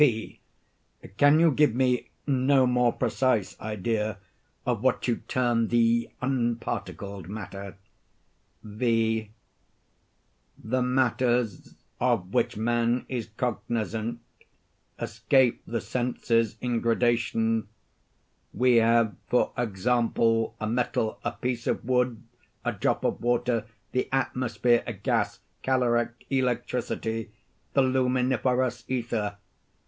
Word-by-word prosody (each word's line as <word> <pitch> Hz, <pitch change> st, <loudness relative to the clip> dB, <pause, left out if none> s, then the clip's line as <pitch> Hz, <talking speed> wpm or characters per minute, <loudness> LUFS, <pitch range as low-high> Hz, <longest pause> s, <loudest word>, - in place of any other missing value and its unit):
P. 115 Hz, -7 st, +2 dB, 0.8 s
Can 145 Hz, +2 st, +6 dB
you 165 Hz, -1 st, +5 dB
give 145 Hz, -4 st, +3 dB
me 125 Hz, -1 st, +1 dB, 0.2 s
no 135 Hz, -1 st, +3 dB
more 125 Hz, -1 st, +3 dB
precise 125 Hz, -7 st, 0 dB
idea 110 Hz, 0 st, -2 dB, 0.5 s
of -, -, 0 dB
what -, -, +1 dB
you 120 Hz, -, +1 dB
term 120 Hz, -3 st, +1 dB
the 115 Hz, 0 st, +2 dB
unparticled 115 Hz, -7 st, -2 dB
matter? 100 Hz, -2 st, -7 dB, 0.9 s
V. 110 Hz, 0 st, 0 dB, 1.3 s
The 125 Hz, +4 st, -1 dB
matters 125 Hz, -4 st, +1 dB, 0.2 s
of 115 Hz, -7 st, 0 dB
which -, -, +1 dB
man 120 Hz, +2 st, +1 dB
is 120 Hz, -4 st, -3 dB
cognizant 115 Hz, -1 st, -2 dB, 0.8 s
escape 130 Hz, -3 st, +2 dB
the 115 Hz, 0 st, -1 dB
senses 115 Hz, -2 st, 0 dB
in 120 Hz, -2 st, 0 dB
gradation. 115 Hz, -2 st, +1 dB, 0.9 s
We 125 Hz, +1 st, +4 dB
have, 115 Hz, -1 st, +4 dB
for 125 Hz, -, +2 dB
example, 115 Hz, +1 st, +1 dB
a 110 Hz, -, -2 dB
metal, 115 Hz, -1 st, -1 dB
a 120 Hz, -, -1 dB
piece 120 Hz, -1 st, -3 dB
of -, -, -1 dB
wood, 125 Hz, -2 st, +1 dB, 0.4 s
a -, -, +1 dB
drop -, -, -1 dB
of -, -, -1 dB
water, 120 Hz, -2 st, +1 dB, 0.2 s
the 130 Hz, -, -1 dB
atmosphere, 125 Hz, -2 st, +1 dB
a 120 Hz, -, -2 dB
gas, 100 Hz, 0 st, -1 dB, 0.2 s
caloric, 120 Hz, -2 st, 0 dB
electricity, 120 Hz, -3 st, -1 dB, 0.4 s
the 135 Hz, -, +4 dB
luminiferous 130 Hz, -1 st, +1 dB
ether. 115 Hz, -5 st, -2 dB
120 Hz, 105 wpm, -27 LUFS, 115-125 Hz, 1.3 s, Can